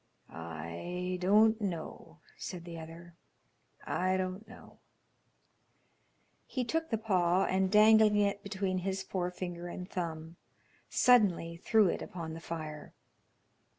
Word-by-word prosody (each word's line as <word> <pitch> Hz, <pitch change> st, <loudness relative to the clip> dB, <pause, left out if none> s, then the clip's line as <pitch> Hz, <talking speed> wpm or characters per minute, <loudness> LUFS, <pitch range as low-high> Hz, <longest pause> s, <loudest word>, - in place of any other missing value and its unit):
"I 85 Hz, -, -5 dB
don't 215 Hz, +4 st, +4 dB
know," 165 Hz, -3 st, -5 dB
said 175 Hz, -2 st, -7 dB
the 170 Hz, -1 st, -7 dB
other. 165 Hz, +2 st, -11 dB, 0.7 s
"I 185 Hz, +1 st, 0 dB
don't 185 Hz, +3 st, -4 dB
know." -, -, -15 dB, 1.7 s
He 255 Hz, -, -2 dB
took 325 Hz, +6 st, -1 dB
the 225 Hz, -, 0 dB
paw, 185 Hz, -4 st, +2 dB
and 190 Hz, 0 st, +1 dB
dangling 215 Hz, 0 st, +6 dB
it 205 Hz, -1 st, +1 dB
between 195 Hz, -2 st, -2 dB
his 190 Hz, +1 st, -2 dB
forefinger 180 Hz, -2 st, -4 dB
and 180 Hz, +1 st, -6 dB
thumb, 165 Hz, -3 st, -5 dB, 0.5 s
suddenly 200 Hz, -9 st, +4 dB
threw 215 Hz, +3 st, +3 dB
it -, -, -1 dB
upon 165 Hz, -3 st, -6 dB
the 165 Hz, -, -7 dB
fire. 155 Hz, -3 st, -7 dB
185 Hz, 115 wpm, -32 LUFS, 170-205 Hz, 1.7 s, dangling